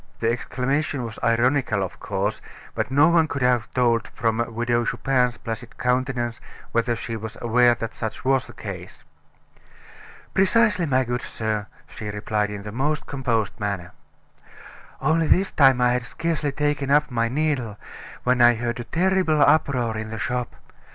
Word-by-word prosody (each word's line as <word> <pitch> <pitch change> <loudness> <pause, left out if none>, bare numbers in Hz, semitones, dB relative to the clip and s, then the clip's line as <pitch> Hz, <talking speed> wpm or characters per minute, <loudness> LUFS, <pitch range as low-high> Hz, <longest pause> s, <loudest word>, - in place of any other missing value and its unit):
The 115 0 +2
exclamation 135 +3 -1
was 115 -2 -8
ironical, 115 -2 +2
of 95 - -6
course, 100 +2 -2 0.3
but - - -2
no 145 +4 +5
one 165 -2 +4
could 140 -3 -3
have 125 -3 +2
told 115 -3 +2
from 115 -1 -1
the 115 0 -1
Widow 120 +1 0
Chupin's 125 0 +1
placid 115 0 -7
countenance 125 -2 -1 0.3
whether 115 0 +1
she 115 0 -5
was 110 +1 -7
aware 120 +1 +4
that 115 -1 -5
such 110 +2 -5
was 135 -1 +2
the - - -12
case. - - -8 1.3
"Precisely, 195 -2 +3
my 130 -1 +2
good 120 0 -2
sir," 110 -2 -3 0.2
she 105 - -7
replied 105 0 -1
in 105 -1 -6
the 105 - -6
most 145 +6 -1
composed 120 -7 -1
manner. 100 -4 -3 1.1
"Only 160 0 +2
this 190 +4 +3
time 135 -3 +5
I 125 0 +4
had 125 - 0
scarcely 155 +3 -2
taken 145 -1 -1
up 150 0 +3
my 115 -1 0
needle 130 -6 -1 0.5
when 125 0 +2
I 120 0 +7
heard 120 +1 -3
a 120 - -5
terrible 180 +1 +1
uproar 140 -6 +3
in 110 0 -4
the 110 - -5
shop. 120 +3 -3
125 Hz, 165 wpm, -23 LUFS, 115-140 Hz, 1.3 s, I